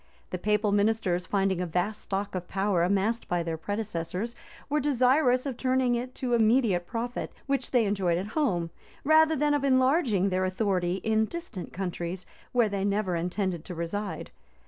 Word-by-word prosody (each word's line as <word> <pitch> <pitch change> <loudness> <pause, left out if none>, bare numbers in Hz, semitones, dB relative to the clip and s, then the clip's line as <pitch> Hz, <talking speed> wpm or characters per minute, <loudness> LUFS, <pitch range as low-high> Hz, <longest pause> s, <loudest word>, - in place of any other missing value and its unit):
The 180 - -3
papal 210 +2 +1
ministers, 200 -4 +1
finding 195 -2 +1
a 180 - -2
vast 180 +6 -1
stock 200 +1 -3
of 180 -1 -4
power 195 -2 +1
amassed 200 +6 +1
by 175 -1 0
their 165 -1 -2
predecessors, 205 +3 -3 0.3
were 300 +1 +1
desirous 255 -1 +3
of 265 -4 -3
turning 255 -1 +2
it 250 +2 -3
to 250 -2 -2
immediate 220 -6 +3
profit, 240 +1 -4
which 275 -2 -1
they 245 -4 +3
enjoyed 190 -4 +1
at 190 +4 -4
home, 180 - 0 0.3
rather 315 +2 +5
than 295 0 +2
of 290 -1 0
enlarging 260 - +3
their 185 0 0
authority 185 -2 0
in 220 0 +2
distant 295 - -7
countries, 180 -1 -4 0.3
where 240 -3 +3
they 200 -1 -2
never 200 -2 0
intended 180 0 -2
to 180 - -7
reside. 185 +5 -4
205 Hz, 170 wpm, -28 LUFS, 185-250 Hz, 0.3 s, rather